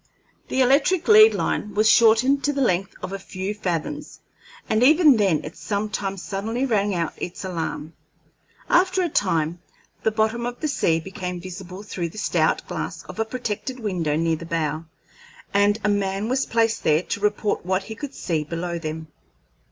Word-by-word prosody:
The 265 - 0
electric 280 +7 +3
lead 435 0 +8
line 210 -1 -2
was 215 +1 +4
shortened 235 +5 +5
to 290 - +1
the 280 - -3
length 195 -5 0
of 185 +1 -4
a 195 - -4
few 190 +1 -5
fathoms, 205 - -4 0.5
and 220 +1 +1
even 300 0 +6
then 190 -7 +2
it 150 - -8
sometimes 200 -2 -3
suddenly 225 +6 -2
rang 205 -5 +1
out 170 -2 -1
its 180 +2 -6
alarm. 165 -3 -4 0.7
After 370 +1 +3
a 345 - 0
time 170 - 0 0.4
the - - +2
bottom 220 +2 0
of 245 0 -6
the 310 - -1
sea 165 - +1
became 180 0 -6
visible 185 +1 -8
through 175 -5 -4
the 190 - -14
stout - - +1
glass - - -5
of - - -10
a 225 - +1
protected 250 +2 -4
window 180 -9 -1
near 165 +1 +1
the 170 - -9
bow, 160 -1 -2 0.7
and 205 +1 +3
a 205 - +2
man 200 +1 -1
was 265 +1 0
placed 225 -1 +1
there 155 +3 +3
to - - -3
report 210 0 0
what 185 +2 0
he 220 - -7
could 275 +5 -7
see 160 -4 -1
below 170 +2 -4
them. 160 0 -5
205 Hz, 175 wpm, -23 LUFS, 175-235 Hz, 0.7 s, lead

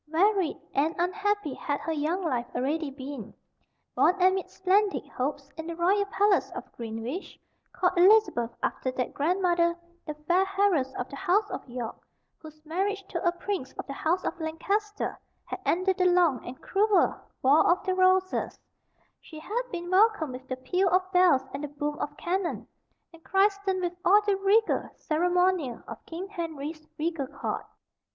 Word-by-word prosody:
Varied 365 +2 +2 0.2
and 305 +4 +1
unhappy 400 -2 0
had 285 +2 -3
her 330 - -3
young 320 +5 -1
life 250 -7 -1
already 295 +4 -1
been. 270 -4 -8 0.6
Born 370 +2 +3
amid 375 +1 +2
splendid 390 +2 +1
hopes, 275 +2 -3
in 320 0 -6
the 335 - -4
royal 390 +4 +2
palace 405 0 +2
of - - -8
Greenwich; 230 - -6 0.3
called 365 0 +1
Elizabeth 365 - +5
after 260 - -1
that 250 -1 -2
grandmother, 345 +1 +1 0.3
the 300 - -4
fair 360 +2 +4
heiress 345 -10 +3
of 250 - -3
the - - -8
House 390 +5 +2
of - - -6
York, 240 -2 -5 0.4
whose 310 0 -14
marriage 390 +5 -2
to 340 - -3
a 345 - +3
prince 350 -6 -4
of - - -6
the 275 - -6
House 340 +6 0
of 350 - -3
Lancaster 400 +7 -2 0.3
had - - -5
ended 370 +2 +1
the 365 - +3
long 350 -7 +3
and 250 +1 -8
cruel 410 +1 +3 0.3
War 280 +4 +6
or 350 - +4
the 375 - +1
Roses; 370 0 +2 0.6
she 315 - -12
had 420 +10 -2
been 350 0 -5
welcomed 385 - +3
with 260 +1 -9
the 255 - -4
peal 360 +9 +1
of 370 +1 +1
bells 360 -8 +5
and 280 +2 -5
the - - -2
boom 290 +1 -4
of 290 0 -4
cannon, 360 0 -2 0.5
and 330 0 -16
christened 390 -1 +1
with 350 0 -1
all 410 +3 +5
the 410 -1 +2
regal 395 +3 +2
ceremonial 355 -4 +1
of - - -9
King 345 +4 -6
Henry's 315 -4 -6
regal 310 -3 -2
court. - - -4
345 Hz, 165 wpm, -28 LUFS, 295-385 Hz, 0.6 s, War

